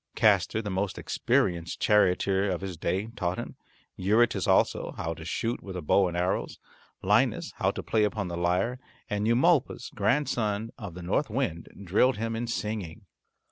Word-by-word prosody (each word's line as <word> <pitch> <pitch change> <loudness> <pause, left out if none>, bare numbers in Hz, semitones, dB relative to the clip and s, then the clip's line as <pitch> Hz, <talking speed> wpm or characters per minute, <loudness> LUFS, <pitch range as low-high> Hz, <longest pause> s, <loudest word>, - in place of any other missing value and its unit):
Castor, 105 +1 +3
the 105 - -4
most 95 +1 -2
experienced 85 -3 0
charioteer 100 -1 +3
of 90 -2 -2
his 95 -2 -5
day, 95 +6 -2
taught 90 -1 -2
him, - - -6 0.4
Eurytus 110 +5 +2
also, - - +2
how 80 0 -2
to 80 - -10
shoot 115 +8 -2
with 95 -2 -8
a - - -4
bow 95 +5 +3
and 85 0 -4
arrows; 90 +2 -1 0.5
Linus - - +2
how - - +2
to - - -4
play 110 -1 +1
upon 105 -2 -1
the 85 - -4
lyre; 90 +8 0 0.3
and 105 +1 0
Eumolpus, 130 +2 +2
grandson 110 -2 0
of 100 -7 -8
the 90 - -8
North 100 +11 0
Wind, 105 -9 -2 0.2
drilled 105 +7 +3
him 115 +1 -2
in 120 +1 -3
singing. 105 -4 -4
100 Hz, 170 wpm, -28 LUFS, 90-115 Hz, 0.5 s, Castor